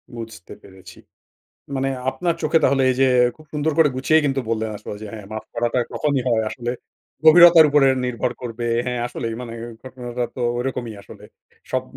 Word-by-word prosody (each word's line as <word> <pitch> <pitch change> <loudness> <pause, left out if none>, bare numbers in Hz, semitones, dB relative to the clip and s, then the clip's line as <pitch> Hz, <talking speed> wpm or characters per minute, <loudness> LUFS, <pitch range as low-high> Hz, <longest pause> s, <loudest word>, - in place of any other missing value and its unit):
বুঝতে 110 -5 -9
পেরেছি। 95 -1 -15 0.8
মানে 135 0 0 0.2
আপনার 175 +2 -1
চোখে 165 - +3
তাহলে 135 -1 +3
এইযে 130 +1 +2 0.3
খুব 155 0 -18
সুন্দর 155 +1 0
করে 155 -2 +6
গুছিয়ে 155 +4 +3
কিন্তু 135 -1 0
বললেন 110 -1 -1
আসল - - -10
যে 110 - -6
হ্যাঁ 105 -3 -9
মাফ 110 - -6
করাটা 120 +1 0
কখনই 145 -3 0
হয় 110 -2 +2
আসলে 120 0 -4 0.5
গভীরতার 170 0 +9
উপরে 145 -2 +4 0.2
নির্ভর 125 0 -2
করবে। 120 0 -5 0.2
হ্যাঁ, 125 -1 -2
আসলেই 115 -2 -5
মানে 115 - -8 0.3
ঘটনাটা 125 -1 -5
তো - - -5 0.2
ঐরকমই 125 -3 -4
আসলে। - - -14 0.5
সব - - 0
125 Hz, 165 wpm, -21 LUFS, 115-145 Hz, 0.8 s, গভীরতার